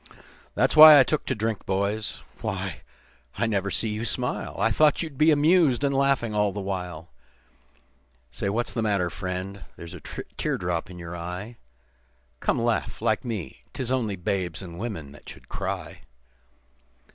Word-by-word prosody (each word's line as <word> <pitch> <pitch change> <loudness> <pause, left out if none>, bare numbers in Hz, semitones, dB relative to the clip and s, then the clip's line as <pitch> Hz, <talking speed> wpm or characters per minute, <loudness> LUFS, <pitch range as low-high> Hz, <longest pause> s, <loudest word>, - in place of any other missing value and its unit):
"That's - - +2
why 155 -1 +11
I - - +8
took 150 +3 -2
to 130 - 0
drink, 110 -1 -3
boys. 100 +3 -1 0.2
Why, - - -4 0.6
I 115 - +1
never 100 -3 0
see 110 - 0
you 105 +1 -3
smile, 125 +1 -3
I 115 +3 +2
thought 150 +7 +3
you'd 155 -4 -7
be 155 +4 +4
amused, 150 -3 +4
and 140 -1 +2
laughing 135 -5 +1
all 105 -1 +2
the 100 - -5
while. 90 -4 -5 1.3
Why, 100 - 0
what's 115 +4 -1
the 115 - -1
matter, 100 -5 +1
friend? 95 +1 -5
There's 85 0 -10
a - - -8
tear - - -4
drop 90 -1 -2
in 90 - -10
you 85 0 -7
eye, 90 +7 -6 0.8
Come, - - 0
laugh - - -1
like - - +1
me. 100 - -5
'Tis 130 -1 -3
only 115 -6 0
babes 90 -1 -2
and 85 -1 -9
women 100 -11 -5
that 75 - -13
should - - -12
cry. - - -5
105 Hz, 165 wpm, -26 LUFS, 90-125 Hz, 1.3 s, why